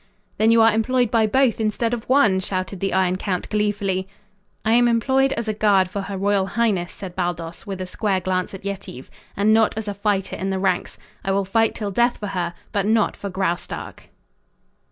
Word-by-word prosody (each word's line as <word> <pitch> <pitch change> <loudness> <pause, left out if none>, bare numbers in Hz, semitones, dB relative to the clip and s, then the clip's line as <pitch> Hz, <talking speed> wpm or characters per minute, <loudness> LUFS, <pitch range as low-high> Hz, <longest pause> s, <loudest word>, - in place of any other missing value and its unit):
"Then 220 +1 +4
you 230 0 +6
are 225 -1 +5
employed 245 +1 +1
by 225 -2 +3
both 255 +1 +2
instead 225 +2 0
of 235 -1 -5
one!" 230 -8 +4
shouted 185 0 -3
the 195 +1 -1
Iron 185 -1 +2
Count 185 -2 -2
gleefully. 200 -3 0 0.6
"I 220 - +3
am 240 +1 +5
employed 265 +4 +2
as 230 -1 -4
a 215 - 0
guard 200 -3 +3
for 200 0 -3
her 195 0 -5
royal 195 0 +1
highness," 195 -3 0
said 185 -3 -9
Baldos, 170 +2 -4
with 195 -2 -5
a 185 - -3
square 195 +1 -1
glance 185 +1 -2
at 190 - -11
Yetive, 195 -10 -6 0.3
"and 210 +2 +4
not 220 -1 +3
as 220 -1 -4
a 205 - -2
fighter 200 -1 -1
in 195 - -3
the 190 - -1
ranks. 185 -2 -1 0.3
I 195 - -1
will 195 0 +1
fight 225 +3 +1
till 205 -3 -3
death 240 +4 +2
for 205 - -5
her, 175 -2 -3 0.2
but 200 0 0
not 220 -1 +2
for 200 - -6
Graustark." 185 -2 -4
200 Hz, 205 wpm, -22 LUFS, 190-225 Hz, 0.6 s, you